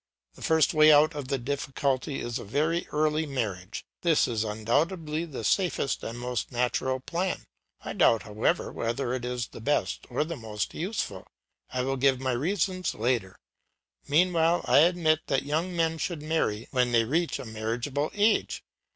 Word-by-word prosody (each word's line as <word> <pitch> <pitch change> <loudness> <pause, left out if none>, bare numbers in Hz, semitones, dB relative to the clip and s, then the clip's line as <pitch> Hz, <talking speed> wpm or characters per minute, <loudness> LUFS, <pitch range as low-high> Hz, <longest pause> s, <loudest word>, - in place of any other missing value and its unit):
The - - -16
first 160 -1 +3
way 155 0 +7
out 150 +2 +6
of 145 -3 -5
the 135 0 0
difficulty 135 +1 -2
is 120 +1 -3
a - - -7
very 155 - 0
early 155 +1 0
marriage; 105 -8 -4 0.2
this 165 -3 +3
is 115 -3 -1
undoubtedly 150 - -1
the 140 -8 -7
safest 175 - 0
and 115 - -5
most 125 0 -3
natural 125 +1 0
plan. 175 +7 -2 0.4
I - - -4
doubt, 115 -3 +4
however, 105 +1 0
whether 120 +2 -2
it 130 -1 -3
is 125 -1 -3
the - - -11
best 145 +6 -1
or - - 0
the 165 +2 -5
most 110 -5 -4
useful. 170 - -4 0.4
I 125 0 -1
will 135 +1 -1
give 135 0 +3
my 130 0 -1
reasons 185 +7 -1
later; 115 -5 -1 0.7
meanwhile 165 +2 +3
I - - +5
admit 160 -1 +4
that 135 - +1
young 160 +5 -1
men 165 -1 0
should 165 -3 -3
marry 155 -9 -1
when 125 -2 +1
they 115 -1 +5
reach 160 +8 0
a - - -7
marriageable 115 +7 -2
age. 210 +1 +2
140 Hz, 170 wpm, -27 LUFS, 120-160 Hz, 0.7 s, way